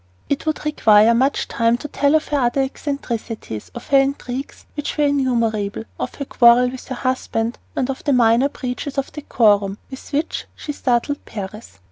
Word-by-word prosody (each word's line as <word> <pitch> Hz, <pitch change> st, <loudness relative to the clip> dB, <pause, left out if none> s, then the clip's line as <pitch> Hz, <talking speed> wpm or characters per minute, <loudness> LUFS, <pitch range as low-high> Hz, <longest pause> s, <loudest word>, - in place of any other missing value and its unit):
It 285 Hz, +2 st, -1 dB
would 310 Hz, -1 st, -1 dB
require 220 Hz, -7 st, +5 dB
much 265 Hz, +4 st, +1 dB
time 230 Hz, +1 st, +2 dB
to 295 Hz, -, -7 dB
tell 285 Hz, +1 st, +2 dB
of 310 Hz, -, +1 dB
her 290 Hz, -, +1 dB
other 250 Hz, +2 st, +2 dB
eccentricities, 235 Hz, -, -5 dB
of 240 Hz, -, -9 dB
her 275 Hz, -, +6 dB
intrigues, 270 Hz, -1 st, -3 dB
which 295 Hz, 0 st, -4 dB
were 300 Hz, -, +3 dB
innumerable, 230 Hz, -, 0 dB, 0.2 s
of 125 Hz, -, -4 dB
her 280 Hz, -, -5 dB
quarrel 245 Hz, 0 st, +5 dB
with 260 Hz, -, -9 dB
her 260 Hz, -, -4 dB
husband, 245 Hz, -2 st, -2 dB, 0.2 s
and 255 Hz, -, 0 dB
of 270 Hz, -1 st, -5 dB
the 290 Hz, -, +1 dB
minor 240 Hz, +2 st, +4 dB
breaches 265 Hz, +2 st, -5 dB
of 275 Hz, -, -1 dB
decorum 205 Hz, -8 st, +2 dB
with 265 Hz, -, -9 dB
which 300 Hz, +3 st, -2 dB
she 295 Hz, -, -5 dB
startled 270 Hz, +1 st, 0 dB
Paris. 205 Hz, -, -8 dB
255 Hz, 175 wpm, -20 LUFS, 230-280 Hz, 0.2 s, her